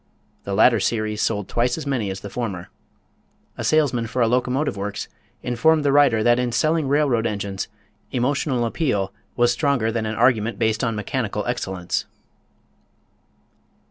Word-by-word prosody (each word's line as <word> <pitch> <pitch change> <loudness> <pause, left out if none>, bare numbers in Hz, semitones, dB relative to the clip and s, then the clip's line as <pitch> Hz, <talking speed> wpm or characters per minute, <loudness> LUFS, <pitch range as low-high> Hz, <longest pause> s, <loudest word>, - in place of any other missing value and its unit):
The 100 - -2
latter 115 +2 +5
series 110 0 -1
sold 105 -3 -1
twice 120 +1 0
as 160 - -6
many 125 -8 -1
as 95 0 -5
the 100 - -7
former. 100 -8 -4 0.9
A - - -5
salesman 135 -7 +2
for 125 - -4
a - - +3
locomotive 125 +2 0
works 100 +1 -4 0.4
informed 145 +6 +2
the 140 - +4
writer 135 -6 +4
that 120 +1 +4
in 125 -1 0
selling 155 +5 +1
railroad 135 -5 +2
engines 100 -2 -3 0.4
emotional 130 0 0
appeal 105 - -1 0.2
was 120 0 +3
stronger 140 -7 +1
than 110 -1 -2
an 110 - -3
argument 115 -2 +2
based 110 +1 0
on 115 -2 0
mechanical 105 -1 -2
excellence. 95 -7 -2
120 Hz, 150 wpm, -22 LUFS, 105-130 Hz, 0.9 s, latter